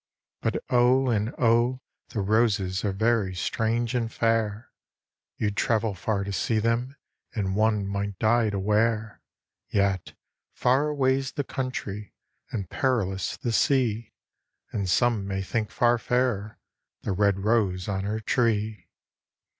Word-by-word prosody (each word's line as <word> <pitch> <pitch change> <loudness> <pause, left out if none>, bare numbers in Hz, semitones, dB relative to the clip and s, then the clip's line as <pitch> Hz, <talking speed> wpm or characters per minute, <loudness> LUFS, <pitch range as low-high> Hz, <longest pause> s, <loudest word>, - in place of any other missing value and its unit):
But - - -1
O, 125 +2 +4
and 105 -1 +1
0, 120 +2 +3 0.3
the 105 - -2
roset 100 -3 +1
are 100 - +1
very 110 -1 +1
ilrange 115 +5 -1
and 115 -2 -1
fair. 115 -1 0 0.7
You'd 105 -1 -1
travel 110 -1 +1
far 100 +2 -1
to 100 - -4 0.2
lee 110 - +3
them, 115 +4 0 0.4
and 95 -3 -1
one 105 -1 +2
might 100 0 -3
die 115 +1 +3
to 100 - -2
wear. 105 +2 0 0.5
Yet, 100 -3 0 0.4
far 130 +4 +2
away"! 135 -2 +2
the 140 +2 -3
country, 110 -6 -5 0.3
and 100 -5 -4
feriloui 100 -6 -1
the 120 - -1
sea. 115 -3 +1 0.6
And 100 -3 -2
some 115 0 +2
may 95 -1 -2
think 105 +2 -2
far 120 0 +2
fairer 120 -4 0 0.5
the - - -1
red 100 0 +2
rose 100 -4 +1
on 95 -2 -2
her 105 +2 -2
tree. 110 -4 0
110 Hz, 135 wpm, -26 LUFS, 100-120 Hz, 0.7 s, O